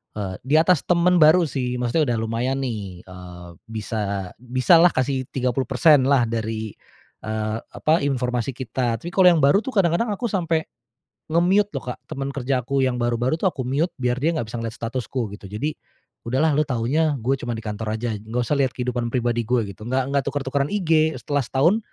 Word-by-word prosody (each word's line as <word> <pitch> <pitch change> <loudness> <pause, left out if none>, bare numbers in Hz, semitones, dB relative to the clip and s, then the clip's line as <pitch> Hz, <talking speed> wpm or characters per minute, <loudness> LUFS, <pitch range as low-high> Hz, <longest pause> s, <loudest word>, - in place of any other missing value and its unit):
eee, 95 -3 -4
di 145 +4 +2
atas 165 -1 +3
temen 180 0 +3
baru 165 +3 +6
sih, 125 -2 -2
maksudnya 125 +1 +1
udah - - -1
lumayan 120 +4 -1
nih. 100 -8 -5
Eee, 90 -1 -11 0.2
bisa 105 -4 -4
bisalah 130 +8 +4
kasih 130 0 -1
30% 130 +2 +3
lah 135 -3 +4
dari, 110 -1 -3 0.5
eee, 110 0 -2
apa, 155 +7 +1
informasi 125 -2 -1
kita. 125 -2 -2
Tapi 175 - -5
kalau 185 -1 +5
yang 160 -4 +2
baru 145 +9 +5
tuh 265 - -4
kadang-kadang 195 +4 +2
aku 235 +3 -3
sampai 165 -4 0 0.7
nge-mute 185 +5 +3
loh, - - -6
Kak, - - -18
temen 135 0 -4
kerja 130 -1 -1
aku 135 0 0
yang 130 -2 +1
baru-baru 120 +5 0
tuh 190 - -3
aku 135 - -6
mute 140 +8 0
biar 125 +1 +1
dia 160 +5 +1
nggak 120 -9 -3
bisa 120 - -5
ngeliat 115 -1 -4
statusku 120 -1 -4
gitu. 100 - -14
Jadi, 115 +11 -4 0.5
“Udahlah 135 +6 +2
lu 150 - +3
taunya 140 +5 +1
gue 135 +4 +1
cuma 120 -2 -4
di 110 - -6
kantor 110 0 -3
aja. 115 -3 -2
Nggak 110 +4 -3
usah 145 - +2
lihat 130 -3 +1
kehidupan 120 -1 -3
pribadi 120 -2 0
gue,” 125 0 +2
gitu. 105 +3 -10
Nggak 130 +2 -1
nggak 140 -1 +1
tuker-tukeran 140 0 -1
IG 160 -5 +2
setelah 145 +4 -1
setahun 170 +11 +2
130 Hz, 190 wpm, -23 LUFS, 115-155 Hz, 0.7 s, baru